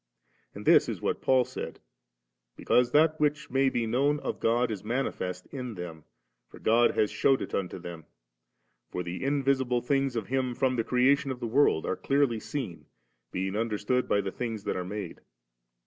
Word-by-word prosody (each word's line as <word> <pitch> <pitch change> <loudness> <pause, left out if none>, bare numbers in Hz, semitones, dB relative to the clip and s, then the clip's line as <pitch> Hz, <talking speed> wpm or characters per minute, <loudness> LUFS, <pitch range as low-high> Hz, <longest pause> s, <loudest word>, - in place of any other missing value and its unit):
And - - -8
this - - +6
is - - -4
what - - -2
Paul 130 -1 +3
said, - - -7 0.4
* - - -56
Because 125 -1 +3
that 155 +1 +4
which 150 -1 0
may 135 +1 +3
be 120 -3 -1
known 140 +6 +1
of - - -4
God 120 +1 +2
ii 105 - -2
manifest 105 -6 -3
in 125 -5 -5
them, 85 -4 -8 0.4
for - - -13
God 115 +2 +3
has 105 - +2
shewed 135 -1 +3
it - - -6
unto 95 -2 -2
them: 85 -3 -9 0.8
for 90 - -3
the 90 +4 -5
invisible 135 -3 +1
things 135 -1 +1
of 115 -3 -2
Him 130 0 -1
from 130 0 +1
the 115 - 0
creation 130 +4 +3
of 130 -2 -4
the 120 - -4
world 115 - +3
are - - -1
clearly 135 -5 +1
seen, 115 -9 -5 0.4
being 95 +1 -2
understood 115 +3 0
by 100 - +3
the 95 -1 -4
things 115 -3 -4
that - - -2
are 90 - -2
made^.' 100 +3 -6
120 Hz, 185 wpm, -28 LUFS, 100-135 Hz, 0.8 s, this